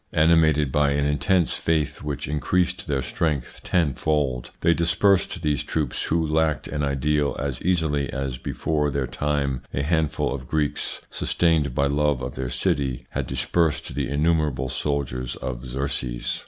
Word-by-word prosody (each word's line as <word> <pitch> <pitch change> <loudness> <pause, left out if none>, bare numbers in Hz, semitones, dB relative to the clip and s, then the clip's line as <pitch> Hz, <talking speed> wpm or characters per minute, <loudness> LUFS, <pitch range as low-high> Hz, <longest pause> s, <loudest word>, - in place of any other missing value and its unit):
Animated 80 -3 +4
by 70 0 +3
an 70 0 +1
intense 80 +5 +2
faith 80 -3 0
which 75 -3 -4
increased 90 +6 0
their 70 -4 0
strength 75 -5 -2
tenfold, 75 -5 0
they 85 0 +4
dispersed 90 +1 +2
these 75 -2 +1
troops 75 -6 -2
who 80 0 +1
lacked 80 0 +1
an 75 - -3
ideal 75 +1 +1
as 70 -2 -3
easily 80 -6 +1
as 65 -2 -3
before 75 +2 -1
their 70 -1 -1
time 70 0 -1
a 70 - 0
handful 80 -2 0
of 65 -2 -6
Greeks, 75 -2 -1
sustained 80 -7 +1
by 70 - +3
love 75 -1 +1
of - - -4
their 65 -1 -3
city, 65 -1 -1
had - - -2
dispersed 85 -3 0
the 70 -2 -2
innumerable 75 -3 +1
soldiers 65 -2 -2
of 65 0 -5
Xerxes. 65 -2 -2
75 Hz, 150 wpm, -24 LUFS, 70-80 Hz, -, Animated